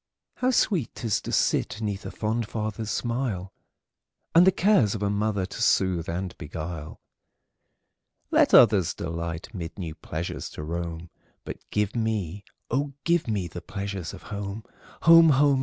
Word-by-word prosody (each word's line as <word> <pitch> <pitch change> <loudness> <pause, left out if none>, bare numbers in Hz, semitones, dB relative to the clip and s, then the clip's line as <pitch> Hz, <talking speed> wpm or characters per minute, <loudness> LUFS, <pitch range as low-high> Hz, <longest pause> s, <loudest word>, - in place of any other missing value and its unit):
How 255 - +1
sweet 190 - +1
't - - -7
is 110 - +1
to - - -6
sit 105 - +1
'neath 105 -2 -3
a - - -4
fond 110 +1 -2
father's 110 0 -4
smile, 115 -6 -2 0.8
And 175 +2 +7
the - - +8
cares 175 - +3
of 105 - -3
a 100 - +1
mother 100 -2 0
to 95 - -7
soothe 95 -6 +2
and 90 +2 -3
beguile! 80 -1 -6 1.3
Let - - +4
others 100 -7 +6
delight 85 +4 -5
mid 85 -3 -6
new 85 -5 -5
pleasures 80 +1 -5
to 75 - -4
roam, 85 +1 -5 0.3
But - - -7
give 105 +1 -1
me, 105 -5 -2 0.3
oh, 140 +3 0
give 170 -3 +2
me, 100 -5 -1
the 85 +1 -8
pleasures 100 -6 -5
of - - -11
home! 100 +1 -5 0.4
Home! 165 -1 +8
home! 140 -1 +4
105 Hz, 155 wpm, -26 LUFS, 85-115 Hz, 1.3 s, the